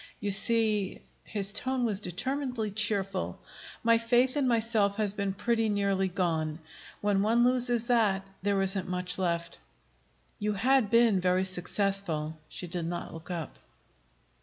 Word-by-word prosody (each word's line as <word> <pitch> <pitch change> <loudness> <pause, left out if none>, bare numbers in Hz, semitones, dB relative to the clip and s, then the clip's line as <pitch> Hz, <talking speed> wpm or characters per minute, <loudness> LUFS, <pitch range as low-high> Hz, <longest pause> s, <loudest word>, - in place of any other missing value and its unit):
You 205 -1 -2
see," 215 -1 +4 0.3
his 200 -2 +1
tone 255 0 +1
was 210 -4 0
determinedly 245 - -3
cheerful, 200 -2 0 0.4
"my 230 0 +4
faith 245 +3 +2
in 285 -3 +1
myself 225 -4 +1
has 210 -2 0
been 200 -1 -2
pretty 225 +3 0
nearly 200 -2 0
gone. 165 -4 -2 0.4
When 205 -1 +1
one 230 +3 +2
loses 245 -2 +2
that, 215 -6 +1 0.2
there 200 0 0
isn't 190 -1 -2
much 180 0 -2
left." 170 -2 -2 0.8
"You 210 0 -1
had 255 +1 +2
been 230 -4 +3
very 180 +1 +1
successful." 185 -4 -1
She - - -6
did 175 -1 -4
not 175 0 -5
look 165 +3 -11
up. 170 -5 -6
200 Hz, 140 wpm, -28 LUFS, 185-230 Hz, 0.8 s, see